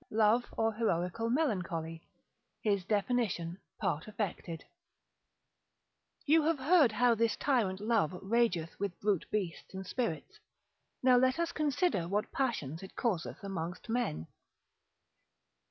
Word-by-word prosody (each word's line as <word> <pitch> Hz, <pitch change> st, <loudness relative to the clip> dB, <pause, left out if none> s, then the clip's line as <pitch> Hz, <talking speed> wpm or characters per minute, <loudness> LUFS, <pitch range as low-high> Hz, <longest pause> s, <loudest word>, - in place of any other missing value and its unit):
Love, 220 Hz, +2 st, +3 dB
or 225 Hz, 0 st, +2 dB
Heroical 210 Hz, 0 st, 0 dB
Melancholy, 180 Hz, -, -1 dB, 0.6 s
his 200 Hz, -3 st, +1 dB
definition, 200 Hz, -5 st, 0 dB, 0.2 s
part 170 Hz, -7 st, -1 dB
affected_. 195 Hz, -6 st, -4 dB, 1.6 s
You 315 Hz, +2 st, +5 dB
have 320 Hz, +1 st, +2 dB
heard 285 Hz, -2 st, +5 dB
how 245 Hz, +2 st, +4 dB
this 230 Hz, -1 st, +1 dB
tyrant 220 Hz, -9 st, +1 dB
Love 210 Hz, -6 st, +2 dB
rageth 195 Hz, -6 st, +1 dB
with 200 Hz, -3 st, -3 dB
brute 200 Hz, -4 st, 0 dB
beasts 190 Hz, -3 st, -3 dB
and 190 Hz, 0 st, -5 dB
spirits; 185 Hz, -, -3 dB, 0.6 s
now 255 Hz, -1 st, +6 dB
let 255 Hz, +2 st, +3 dB
us 335 Hz, 0 st, 0 dB
consider 300 Hz, -, +1 dB
what 205 Hz, +3 st, -1 dB
passions 165 Hz, -, -2 dB
it 190 Hz, -, -11 dB
causeth 200 Hz, -8 st, -2 dB
amongst 180 Hz, +1 st, -5 dB
men. 225 Hz, -, -1 dB
210 Hz, 120 wpm, -32 LUFS, 180-245 Hz, 1.6 s, now